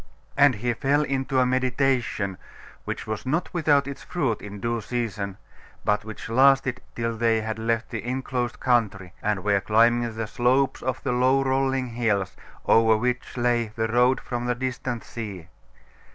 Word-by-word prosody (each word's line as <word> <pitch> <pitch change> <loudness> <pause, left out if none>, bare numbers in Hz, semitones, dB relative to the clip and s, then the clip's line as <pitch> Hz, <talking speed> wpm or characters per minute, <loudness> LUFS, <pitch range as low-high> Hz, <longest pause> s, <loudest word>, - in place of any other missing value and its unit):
And 140 -3 +5
he 120 +3 -1
fell 140 +5 +1
into 135 -1 -1
a 130 - +4
meditation 125 -6 0 0.5
which - - -4
was 110 -1 -4
not 155 +7 -1
without 150 -5 +3
its 140 - -6
fruit 135 - -2
in 105 0 -8
due 115 +1 -1
season, 105 -4 -3 0.5
but 105 0 +1
which 110 0 -8
lasted 135 +1 +3
till 115 -1 -2
they 115 -1 +2
had 110 0 -4
left 115 0 -1
the 115 -3 -4
enclosed 125 -1 -3
country, 100 -8 0
and 105 -3 -1
were 100 -1 +2
climbing 115 +2 +3
the 115 0 -2
slopes 130 +3 +1
of 130 0 -3
the 140 - 0
low 130 +2 +3
rolling 135 -1 0
hills, 110 -5 -1 0.3
over 110 -1 +5
which 125 +2 -2
lay 120 -1 +1
the 110 0 0
road 125 +3 +3
from 120 -1 -4
the 120 - +1
distant 125 -1 -3
sea. 100 -8 -7
120 Hz, 165 wpm, -25 LUFS, 110-130 Hz, 0.5 s, And